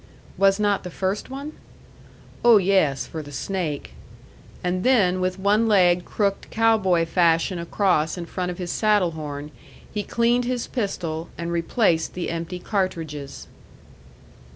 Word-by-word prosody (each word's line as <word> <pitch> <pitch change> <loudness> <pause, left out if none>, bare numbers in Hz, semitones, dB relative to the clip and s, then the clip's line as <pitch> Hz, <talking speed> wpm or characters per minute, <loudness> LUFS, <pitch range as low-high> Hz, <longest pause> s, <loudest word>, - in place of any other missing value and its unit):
"Was 195 +1 +3
not 205 -1 +2
the 180 - -6
first 190 +5 -3
one?" 280 +3 -6 0.9
"Oh, 235 -2 +8
yes, 185 -9 +2
for 160 - -6
the 145 -1 -11
snake." 155 +2 -3 0.7
And 180 +1 -1
then, 190 -8 +3
with 185 0 -1
one 205 +4 +2
leg 180 -4 +4
crooked 200 -2 -1
cow 225 0 +3
boy 180 -4 +2
fashion 170 +1 +2
across 170 -2 +1
in 175 - -5
front 180 +1 -3
of 175 - -5
his 175 -2 -4
saddle 210 -5 +2
horn, 150 -2 -6 0.4
he 210 - -1
cleaned 235 +3 +1
his 245 -1 -2
pistol, 170 -8 -3
and 170 0 -4
replaced 170 0 +1
the 180 -2 -3
empty 170 +2 -4
cartridges. 165 -8 -3
185 Hz, 145 wpm, -23 LUFS, 165-205 Hz, 0.9 s, Oh